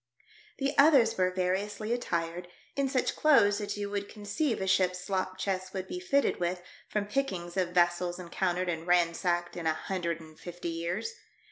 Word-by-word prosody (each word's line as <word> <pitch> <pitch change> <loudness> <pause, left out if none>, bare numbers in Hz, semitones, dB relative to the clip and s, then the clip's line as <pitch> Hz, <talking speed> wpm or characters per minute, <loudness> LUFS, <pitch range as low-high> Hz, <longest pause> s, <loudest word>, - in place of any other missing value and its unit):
The 275 0 -1
others 280 -6 +6
were 185 -1 +2
variously 195 +4 -1
attired, 175 -6 -2 0.3
in 275 -1 +1
such 260 -2 0
clothes 210 -9 +5
as 205 - -3
you 205 0 -2
would 200 0 -3
conceive 215 +6 -2
a 190 - -1
ship's 185 -1 +2
slop 185 0 -2
chest 185 0 -3
would 190 0 -3
be 360 - -4
fitted 280 -7 +1
with 175 0 -1 0.3
from 210 -1 -1
pickings 190 -8 -2
of 185 -2 +1
vessels 175 0 +2
encountered 180 0 -1
and 165 -1 -3
ransacked 175 0 +2
in 170 -2 -3
a 160 - +2
hundred 170 -2 -2
and 155 -1 -14
fifty 175 -1 -6
years. 170 - -3
185 Hz, 170 wpm, -30 LUFS, 175-210 Hz, 0.3 s, others